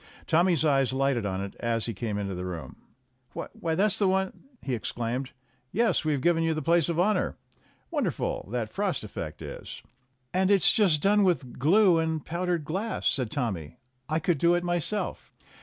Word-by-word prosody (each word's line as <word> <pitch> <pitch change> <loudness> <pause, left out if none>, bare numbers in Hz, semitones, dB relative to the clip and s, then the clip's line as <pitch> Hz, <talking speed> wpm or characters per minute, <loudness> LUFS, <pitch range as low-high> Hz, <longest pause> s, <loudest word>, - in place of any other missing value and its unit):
Tommy's 170 -1 +3
eyes 135 -3 +3
lighted 135 -5 +1
on 95 0 -2
it 100 0 -5
as 115 -1 -1
he 115 - -3
came 105 0 -3
into 100 -1 -3
the 90 0 -5
room. 90 -3 -6 0.6
"Why, 165 -1 -4
that's 200 +2 +2
the 200 - +3
one 190 0 -1
" 250 - -32
he 135 - -2
exclaimed. 120 +3 -3 0.4
"Yes, 230 -1 +2
we've 150 -3 0
given 170 +2 +3
you 165 -1 +1
the 155 - -2
place 170 +1 +3
of 170 0 -1
honor. 195 +1 +1 0.5
Won - - 0
derful, - - -3
that 115 -2 -3
frost 195 - 0
effect 85 -7 -6
is - - -8 0.2
!" 130 -1 -45
"And 185 +1 +2
it's 200 -3 +7
just 175 -9 +3
done 205 +1 +4
with 165 -11 0
glue 175 - +5
and 160 -1 -1
powdered 175 -2 -1
glass," 195 +9 -3
said 130 -5 +2
Tommy. 100 - -3 0.3
"I 155 - +1
could 165 -1 0
do 170 +3 +4
it 175 - 0
myself." 175 +4 -2
155 Hz, 190 wpm, -27 LUFS, 120-180 Hz, 0.6 s, it's